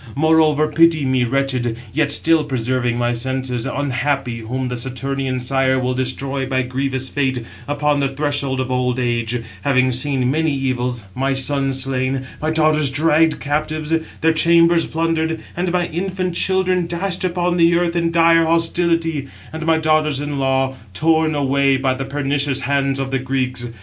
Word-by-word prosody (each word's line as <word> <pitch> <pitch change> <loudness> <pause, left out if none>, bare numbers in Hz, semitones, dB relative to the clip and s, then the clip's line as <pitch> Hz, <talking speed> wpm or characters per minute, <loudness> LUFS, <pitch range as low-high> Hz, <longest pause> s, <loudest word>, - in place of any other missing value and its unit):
Moreover, 155 0 +3
pity 160 -1 +3
me, 130 -1 +1
wretched, 125 -2 -1 0.2
yet 150 0 +1
still 160 +1 +3
preserving 125 -3 -1
my 120 0 0
senses, 125 0 -2
697 145 +1 -2
unhappy, 135 -2 -1
whom 125 +3 -4
the 125 - -3
Saturnian 130 +1 -3
sire 130 +1 +1
will 130 0 -1
destroy 130 +1 -2
by 130 0 0
grievous 130 +1 -2
fate, 130 -4 -1 0.2
upon 145 0 0
the 140 - +1
threshold 140 -1 -1
of 130 0 -2
old 125 -1 0
age, 120 -1 -1 0.2
having 130 0 +2
seen 130 0 +1
many 160 +1 +1
evils, 125 -3 -2
698 130 - -6
my 135 0 +1
sons 135 0 +1
slain, 130 0 -2 0.2
my 155 - 0
daughters 155 -2 +2
dragged 155 +3 +2
captives, 155 +2 -2 0.3
their 160 0 +3
chambers 170 +1 +4
plundered, 160 0 -1 0.2
and 175 0 -1
my 180 -1 +1
infant 185 +1 -3
children 185 -1 +1
dashed 175 +2 -3
upon 180 -1 0
the 170 0 +4
earth 170 0 0
in 170 -1 +1
dire 165 0 +4
hostility, 165 -2 0 0.3
and 160 +1 -5
my 160 -1 +4
daughters 155 -2 +1
in 145 -1 -3
law 135 0 +1 0.2
torn 160 +1 +2
away 140 -1 +2
by 130 -1 0
the 135 +1 -5
pernicious 140 0 0
hands 140 0 0
of 135 0 -3
the 135 - 0
Greeks. 130 -2 -2
140 Hz, 165 wpm, -19 LUFS, 130-160 Hz, 0.3 s, chambers